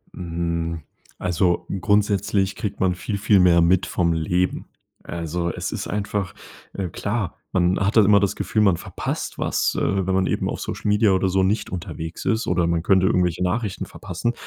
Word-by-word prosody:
Hm, 85 -1 -3 0.4
also 90 0 0 0.2
grundsätzlich 100 -1 +1
kriegt 105 - -4
man 90 -2 +2
viel, 100 +3 -4
viel 100 0 +4
mehr 85 -2 +5
mit 90 +2 +3
vom 85 -2 0
Leben. 90 +3 0 0.4
Also, 85 +1 -3
es - - -4
ist - - -4
einfach 100 -2 -2 0.4
äh, 95 -3 -3
klar, 100 +2 -3 0.2
man 90 0 +2
hat 100 +4 +1
da 110 - +7
immer 100 0 +6
das 100 -1 0
Gefühl, 110 - 0
man 100 -4 +4
verpasst - - -5
was, - - 0
äh, 95 -1 0
wenn 95 - 0
man 95 0 +2
eben - - -1
auf - - -4
Social - - -5
Media 105 0 +4
oder 95 0 +2
so 95 +1 +2
nicht 100 +4 0
unterwegs 85 -2 -6
ist 115 +1 +1
oder 85 -2 +1
man 85 -1 0
könnte 95 0 +4
irgendwelche 90 -2 +1
Nachrichten 100 +2 -1
verpassen. 120 - -4
95 Hz, 185 wpm, -23 LUFS, 85-100 Hz, 0.4 s, da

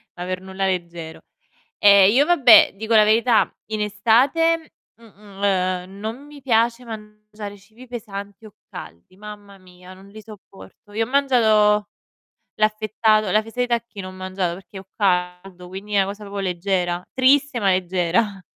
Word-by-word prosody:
ma 175 - -7
per 185 0 -4
nulla 190 +1 -4
leggero. 170 -3 -5 0.6
Ehm, 200 -1 +6
io 270 +6 +3
vabbè, 280 -9 +6
dico 220 +3 -1
la 215 - +7
verità 225 +2 +3 0.2
in 215 0 -4
estate, 260 +11 +1 0.2
m 230 - -22
m 205 -2 -16
ehm, 185 -1 -1
non 225 +6 -6
mi 295 -1 -14
piace 235 -1 +1
mangiare 210 -2 -10
cibi 220 +6 -17
pesanti 205 -3 -8
o 210 - -14 0.2
caldi, 85 - -12
mamma 205 0 -12
mia 180 0 -16
non 190 +1 -16
li 215 +2 -12
sopporto. 205 -1 -16
Io 225 +2 -1
ho - - -13
mangiato 220 -6 +3 0.7
l'affettato 215 -1 +1
la 215 +3 +2
fesa 225 +3 -8
di 245 - +2
tacchino 230 -5 -4
ho - - -8
mangiato 185 -1 -4
perché 190 +1 -12
ho 190 - -18
caldo 180 -1 -2
quindi 195 +3 -9
è - - +1
una 195 - +2
cosa 200 +2 -8
proprio 200 0 -6
leggera, 180 -1 -2
triste 265 0 +2
ma 200 - +1
leggera. 185 +3 0
205 Hz, 160 wpm, -21 LUFS, 190-225 Hz, 0.7 s, la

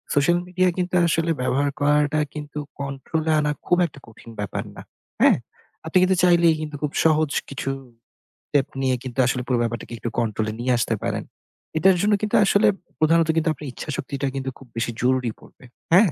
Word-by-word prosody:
social 170 +5 +4
media 185 0 +1
কিন্তু 180 0 -1
আসলে 165 0 +1
ব্যবহার 140 +3 +1
করাটা 150 +1 +2
কিন্তু 150 -1 -6 0.2
control 140 +3 -3
এ - - +4
আনা 150 0 +1 0.2
খুব 175 - +4
একটা 150 - -9
কঠিন 110 +1 -14
ব্যাপার 100 -2 -3
না, - - -9 0.4
হ্যাঁ? - - +6 0.5
আপনি 160 +3 +1
কিন্তু 190 0 +3
চাইলেই 170 -2 +5
কিন্তু 150 -1 -5
খুব 150 - 0
সহজ 155 -2 +4 0.2
কিছু 135 0 -4 0.8
step 140 -1 +2
নিয়ে 130 -1 +2
কিন্তু 130 0 -6
আসলে 125 0 0
পুরো 125 - +2
ব্যাপারটাকে 120 0 -3
একটু 115 - -4
control 110 -1 -1
এ - - -7
নিয়ে 125 +2 0
আসতে 115 -1 0
পারেন। - - -2 0.5
এটার 190 +3 +5
জন্য 210 +1 +3
কিন্তু 215 -1 0
আসলে 200 +1 +4 0.3
প্রধানত 165 +1 +4
কিন্তু 160 0 +2
আপনার 145 0 -8
ইচ্ছাশক্তিটা 140 0 -4
কিন্তু 135 0 -2
খুব 135 - -15
বেশি 120 +1 -1
জরুরি 125 -1 +1
পড়বে, - - -18 0.3
হ্যাঁ? 190 -2 +6
145 Hz, 180 wpm, -23 LUFS, 130-165 Hz, 0.8 s, হ্যাঁ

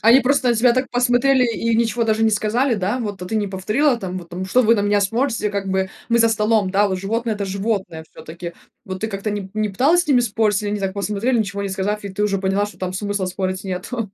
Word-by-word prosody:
Они 235 +4 +6
просто 260 0 +2
на 240 - +4
тебя 235 +2 +4
так 255 +1 -1
посмотрели 250 +1 +3
и 230 0 -1
ничего 235 +1 +1
даже 220 0 +1
не 220 - +4
сказали, 225 +5 +1
да? 205 +5 -1
Вот, 205 -5 -5
а - - -5
ты 220 +4 -2
не 205 -1 0
повторила 215 +9 +1
там, 185 -2 -5
вот 170 -2 -11
там, 180 +2 -4
что 250 +7 +3
вы 230 +1 +5
на 205 - 0
меня 205 0 +2
смотрите, 225 +1 0
как 200 -1 -3
бы, 190 0 0 0.2
мы 235 - +3
за 230 0 +5
столом, 215 -2 +1
да, 200 +2 +3
вот, 190 -1 -2
животные- 225 +3 -2
это 205 - -3
животные 195 -4 -3
всё-таки. 170 +2 -8 0.3
Вот, 185 0 -6
ты 220 - -1
как-то 200 0 -4
ни 205 -2 -4
не 215 0 0
пыталась 280 - +3
с 325 - -12
ними 255 -3 +5
спорить, 215 -3 +1
или 205 - -2
они 205 0 -2
так 195 -1 -1
посмотрели, 210 +5 0
ничего 200 -2 -2
не 200 - -2
сказав, 195 +2 -2
и 200 - -4
ты 200 +2 -3
уже 200 -2 +1
поняла, 195 +2 0
что 205 - -13
там 185 -1 -3
смысла 200 0 -2
спорить 185 0 -3
нету? 195 +4 -4
210 Hz, 260 wpm, -20 LUFS, 195-230 Hz, 0.3 s, Они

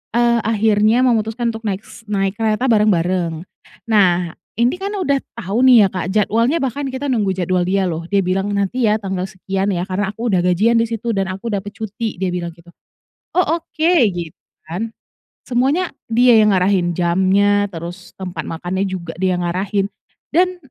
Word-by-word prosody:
eee, 235 0 +3
akhirnya 220 +2 +3
memutuskan 230 0 0
untuk 225 - -7
naik 200 +1 -3
s 230 - -13
naik 195 -2 0
kereta 220 +3 +1
bareng-bareng. 180 -5 +1 0.5
Nah, 180 -5 +3 0.3
ini 240 +5 +3
kan 395 +1 -4
udah 285 -8 +1 0.2
tau 200 +6 -2
nih 235 -6 +7
ya, - - -9
Kak, 185 -2 -3
jadwalnya 230 +8 +2
bahkan 270 +2 -2
kita 265 +2 -4
nunggu 210 -6 +1
jadwal 180 0 0
dia 190 0 +1
loh, 165 0 -4
dia 200 - +3
bilang, 190 +3 -1
"nanti 200 +5 -1
ya 215 +1 +2
tanggal 190 -2 -3
sekian 190 +2 -2
ya, 175 -1 -1
karena 195 +1 -1
aku 230 +3 -4
udah 185 - +3
gajian 195 +6 +3
disitu 230 0 -1
dan 195 -1 -1
aku 195 +5 -6
dapat 205 +1 -3
cuti," 220 0 -5
dia 190 - 0
bilang 175 -1 -3
gitu, 170 +1 -21 0.7
"oh 365 - +4
oke," 330 0 0 0.2
gitu 170 -3 -6 0.3
kan. 215 +7 -3 0.5
Semuanya 275 +9 0 0.2
dia 240 -1 +6
yang 210 -1 +4
ngarahin 180 -2 +1
jamnya, 195 +3 +2
terus 175 +2 -8
tempat 180 -4 -5
makannya 180 +4 -2
juga 175 -3 -5
dia 185 -1 +1
ngarahin, 190 +3 -1 0.5
dan 360 +3 +2
200 Hz, 170 wpm, -19 LUFS, 185-230 Hz, 0.7 s, nih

